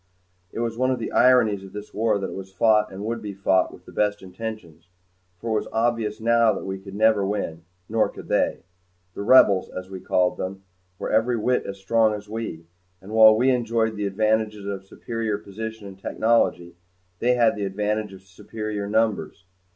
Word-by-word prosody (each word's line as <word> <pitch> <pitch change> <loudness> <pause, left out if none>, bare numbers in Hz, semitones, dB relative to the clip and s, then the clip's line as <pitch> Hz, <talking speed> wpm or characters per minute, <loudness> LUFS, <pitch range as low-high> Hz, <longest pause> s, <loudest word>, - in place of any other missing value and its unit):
It - - -4
was 115 0 -3
one 130 0 +2
of 130 - +1
the - - -5
ironies 115 -6 +4
of 95 - -12
this 105 0 -8
war 110 -1 +1
that 95 -1 -4
it - - -7
was 95 0 -8
fought 105 +2 +3
and 95 +2 -7
would 115 +1 -3
be 105 -2 -6
fought 95 -1 +2
with - - -15
the - - -13
best 105 -1 0
of 95 - -10
intentions. 90 -6 -8 0.5
For 115 +5 -5
it 110 - +2
was - - -7
obvious 115 -2 0
now 115 0 +4
that - - -6
we 95 0 -4
could 95 0 -10
never 110 -1 +3
win 95 -5 -3 0.2
nor 110 0 +1
could - - -11
they. - - 0 0.5
The - - -6
Rebels, 100 -4 +5
as 95 +1 -8
we 95 - -6
called 90 0 +1
them, 95 +1 -5 0.3
were - - -4
every 115 +2 +2
whit 125 +3 0
as 100 - -6
strong 110 +2 +2
as 105 0 -9
we, 105 -7 -5 0.3
and 100 +2 -12
while 110 0 +7
we 130 +3 +3
enjoyed 115 -2 0
the 105 -1 -2
advantages 110 0 0
of 100 -1 -4
superior 115 0 -3
position 110 +2 -7
and 95 -1 -10
technology 100 -6 +1 0.5
they 125 +1 +2
had 115 -2 +3
the 105 - -3
advantage 105 +2 -2
of 95 -1 -13
superior 105 +2 -6
numbers. 110 -2 0
105 Hz, 200 wpm, -24 LUFS, 95-115 Hz, 0.5 s, while